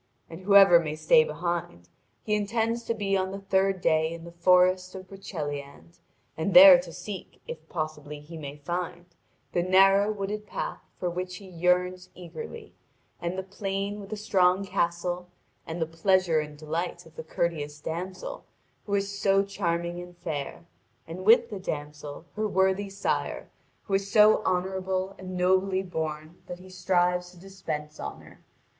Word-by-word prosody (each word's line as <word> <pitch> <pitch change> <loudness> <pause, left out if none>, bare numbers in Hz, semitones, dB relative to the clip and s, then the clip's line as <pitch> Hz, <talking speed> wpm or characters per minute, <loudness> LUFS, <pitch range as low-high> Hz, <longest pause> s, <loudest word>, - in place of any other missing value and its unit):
And 165 +2 -9
whoever 195 -2 +7
may 155 -2 -3
stay 470 - +5
behind, 170 - -4 0.4
he 215 - -1
intends 225 +3 0
to 230 - -1
be 200 -2 0
on 190 0 0
the 195 - -5
third 195 -1 +1
day 160 -1 +2
in 165 0 -8
the 170 - -10
forest 185 +1 +3
of 185 0 -9
Broceliande, 150 -5 -7 0.4
and 160 +5 -2
there 275 -1 +11
to 265 - -8
seek 205 -3 -8
if 485 - -8
possibly 155 -2 -5
he 150 +3 -12
may 145 -3 -7
find 175 +3 -4 0.5
the 175 - +1
narrow 195 +3 +5
wooded 210 +1 -4
path - - -4 0.2
for 180 - -2
which 180 +1 -4
he 195 - -11
yearns 180 +1 0
eagerly, 170 -3 -9 0.5
and 175 +2 -3
the 190 - -2
plain 195 +1 -4
with 200 -1 -10
the 215 - -4
strong 190 -2 +2
castle, 175 0 -2 0.4
and 165 +2 -5
the 160 - +1
pleasure 165 0 +2
and 150 -1 -6
delight 170 +3 -4
of 160 0 -18
the - - -7
courteous 155 -3 -2
damsel, 180 +4 -6 0.4
who 200 - 0
is 200 0 -2
so 195 -1 +3
charming 175 -3 -2
and 175 0 -12
fair, 155 0 -5 0.4
and 180 +3 -8
with 230 +2 +6
the 200 - -5
damsel 150 -2 -6
her 215 0 0
worthy 190 0 +1
sire, 195 0 -2 0.3
who 200 - -6
is 195 0 +1
so 215 +1 +6
honourable 185 +1 -1
and 185 -1 -6
nobly 190 +1 +2
born 160 -2 -5
that 180 - -6
he 185 +1 -14
strives 180 -1 +1
to 180 - -17
dispense 155 -5 -6
honour. 70 - -9
180 Hz, 165 wpm, -27 LUFS, 170-195 Hz, 0.5 s, there